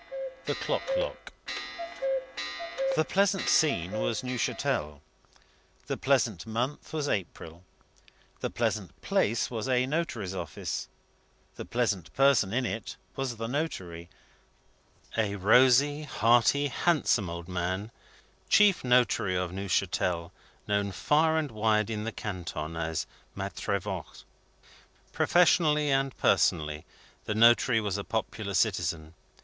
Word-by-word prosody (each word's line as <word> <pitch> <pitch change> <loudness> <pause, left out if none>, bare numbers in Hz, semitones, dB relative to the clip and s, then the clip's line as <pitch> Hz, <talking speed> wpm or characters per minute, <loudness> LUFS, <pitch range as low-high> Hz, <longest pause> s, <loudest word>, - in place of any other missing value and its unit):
THE - - -1
CLOCK - - -2
LOCK - - -4 1.6
The 155 - +2
pleasant 195 +1 +1
scene 115 - +3
was 110 +2 -1
Neuchatel; 95 - -2 0.9
the - - -2
pleasant - - +1
month 120 +6 -3
was 150 -2 -2
April; 85 - -4 0.8
the - - -2
pleasant - - -2
place 115 +3 +1
was 115 +2 -3
a 125 0 +3
notary's 130 - -2
office; 95 - -4 0.7
the - - -7
pleasant 100 -9 -1
person 135 -8 +4
in 125 +3 0
it 115 -1 -4 0.2
was 135 -3 -2
the 115 - -4
notary: 90 - -4 1.1
a 105 -3 0
rosy, 130 +8 +5
hearty, 130 +1 +3
handsome 130 - +1
old 85 0 -6
man, 95 +4 -3 0.6
chief 205 -3 +5
notary 125 -6 +3
of 90 -1 -1
Neuchatel, 90 -2 -1 0.4
known 100 -1 0
far 155 - +2
and 150 -4 -1
wide 110 0 +1
in 105 -1 -3
the 115 - -2
canton 85 -7 -5
as 80 -1 -2 0.3
Maitre 100 0 -2
Voigt. 95 -4 -7 0.9
Professionally 155 -4 +3
and 135 -1 0
personally, 75 0 +2 0.4
the 105 - -2
notary 115 +1 +5
was 105 -2 -2
a - - -4
popular 110 -2 -3
citizen. 85 -5 0
110 Hz, 115 wpm, -29 LUFS, 95-135 Hz, 1.6 s, rosy